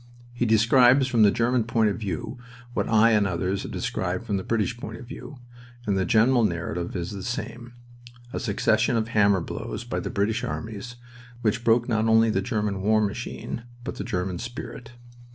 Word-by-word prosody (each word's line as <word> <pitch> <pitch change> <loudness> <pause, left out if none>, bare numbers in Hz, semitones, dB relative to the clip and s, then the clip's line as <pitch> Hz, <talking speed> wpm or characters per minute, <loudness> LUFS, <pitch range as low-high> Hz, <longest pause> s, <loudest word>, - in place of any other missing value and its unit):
He 120 0 0
describes 125 +4 +5
from 120 -3 +2
the 105 - +7
German 120 +2 +1
point 110 -2 +2
of - - -5
view 115 +4 -4 0.3
what - - -1
I 115 +1 +5
and 105 -2 +3
others 95 +2 -1
have - - -6
described 95 +3 -2
from 105 -4 -1
the 95 - -3
British 115 +1 0
point 110 -1 -6
of - - -10
view, 130 +1 -9 0.5
and 100 - +1
the 95 -1 +1
general 120 +4 +4
narrative 85 -2 -2
is 85 -1 -3
the 100 -2 -6
same 120 0 -5 0.6
a - - -2
succession 110 +2 +1
of 110 0 -1
hammer 100 -4 +3
blows - - -5
by - - -3
the - - -4
British 110 +4 0
armies, 115 +2 -5 0.5
which 115 +1 +1
broke 115 +1 +3
not 110 -2 +1
only 110 0 +5
the 95 - +1
German 105 -2 -2
war 110 +2 +3
machine, 105 +2 -3 0.2
but - - -5
the - - -3
German 90 -1 -2
spirit. 120 0 -7
110 Hz, 190 wpm, -25 LUFS, 100-120 Hz, 0.6 s, the